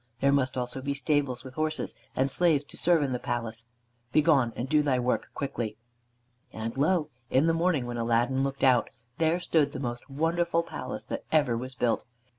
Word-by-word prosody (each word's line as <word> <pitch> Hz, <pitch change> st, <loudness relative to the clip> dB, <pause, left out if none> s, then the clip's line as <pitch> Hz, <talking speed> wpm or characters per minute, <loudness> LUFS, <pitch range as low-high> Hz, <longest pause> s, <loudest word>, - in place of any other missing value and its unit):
There 140 Hz, +1 st, +3 dB
must 130 Hz, -2 st, +2 dB
also 125 Hz, +1 st, -2 dB
be 140 Hz, +1 st, -2 dB
stables 140 Hz, -3 st, 0 dB
with 130 Hz, -, -10 dB
horses, 155 Hz, +2 st, -2 dB, 0.2 s
and 135 Hz, +1 st, +1 dB
slaves 160 Hz, -4 st, +3 dB
to -, -, -14 dB
serve 170 Hz, -3 st, +3 dB
in 135 Hz, -, -1 dB
the 125 Hz, -, -1 dB
palace. 115 Hz, -1 st, -4 dB, 0.5 s
Begone, 145 Hz, -6 st, +4 dB
and 125 Hz, -, -3 dB
do 150 Hz, +2 st, +4 dB
thy 140 Hz, -3 st, +2 dB
work 125 Hz, 0 st, 0 dB
quickly." 115 Hz, -6 st, -3 dB, 0.7 s
And 110 Hz, +1 st, -5 dB
lo! 155 Hz, +2 st, +2 dB, 0.2 s
in 135 Hz, +4 st, +3 dB
the 165 Hz, -, +3 dB
morning 165 Hz, -5 st, +1 dB
when 120 Hz, 0 st, -4 dB
Aladdin 120 Hz, +3 st, +1 dB
looked 135 Hz, 0 st, -2 dB
out, 130 Hz, -3 st, +4 dB, 0.3 s
there 165 Hz, +2 st, +2 dB
stood 155 Hz, -5 st, +1 dB
the -, -, -4 dB
most 120 Hz, 0 st, -4 dB
wonderful 170 Hz, +4 st, +1 dB
palace -, -, -6 dB
that -, -, -5 dB
ever 145 Hz, -7 st, +3 dB
was 130 Hz, +2 st, -5 dB
built. 120 Hz, -2 st, 0 dB
135 Hz, 190 wpm, -28 LUFS, 125-155 Hz, 0.7 s, Begone